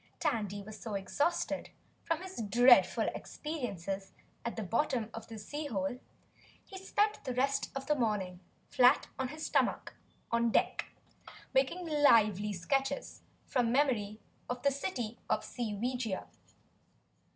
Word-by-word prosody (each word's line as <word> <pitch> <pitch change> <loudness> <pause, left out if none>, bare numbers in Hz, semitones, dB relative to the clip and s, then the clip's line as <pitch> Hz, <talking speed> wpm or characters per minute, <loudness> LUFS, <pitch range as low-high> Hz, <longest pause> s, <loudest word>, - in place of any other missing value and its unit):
Tandy 210 - -1
was 215 +1 -9
so 220 -3 -5
exhausted 285 - -1 0.3
from 330 +2 -1
his 375 -10 -6
dreadful 245 +4 +6
experiences 200 - -5 0.3
at 235 - -3
the 220 - -3
bottom 230 +2 0
of 225 0 -7
the 225 - -8
sea 290 +8 -5
hole 200 0 -2 0.7
he 380 - -9
spent 415 +2 +1
the 255 -2 -3
rest 275 +2 +1
of 270 0 -4
the 300 - +3
morning 210 -9 -1 0.3
flat 250 0 +5
on 260 - 0
his 310 +4 -6
stomach - - +1 0.4
on 235 0 +3
deck - - +1 0.7
making 275 +7 +2
lively 215 - +4
sketches 270 +10 -1 0.2
from 245 -4 +1
memory 235 -6 +1 0.3
of 245 0 -3
the 280 - +4
City 245 - -3
of - - +1
Seeweegia. 235 -1 -2
245 Hz, 130 wpm, -32 LUFS, 210-280 Hz, 0.7 s, dreadful